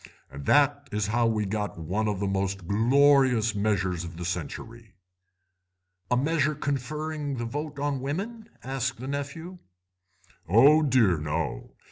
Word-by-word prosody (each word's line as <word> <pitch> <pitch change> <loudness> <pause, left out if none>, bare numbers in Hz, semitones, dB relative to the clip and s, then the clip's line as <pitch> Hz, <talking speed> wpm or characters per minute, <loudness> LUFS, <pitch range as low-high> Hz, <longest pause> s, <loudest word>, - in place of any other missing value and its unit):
And 70 0 -9
that 145 0 +3
is 105 0 -1
how 120 0 +3
we 110 -2 0
got 105 0 -3
one 95 +7 -2
of 105 -3 -1
the 100 - -1
most 95 -2 -2
glorious 125 +1 +4
measures 95 -4 0
of 85 -1 -8
the 85 - -5
century." 110 +6 -6 1.1
"A 125 - +2
measure 150 +2 +1
conferring 145 +2 -3
the 120 - -3
vote 145 +4 -5
on 140 -2 -2
women?" 210 - -4
asked 130 -2 -3
the 130 - -6
nephew. 145 +6 -5 0.9
"Oh 140 - +6
dear, 120 - +3
no. 75 -5 -4
120 Hz, 140 wpm, -27 LUFS, 100-145 Hz, 1.1 s, Oh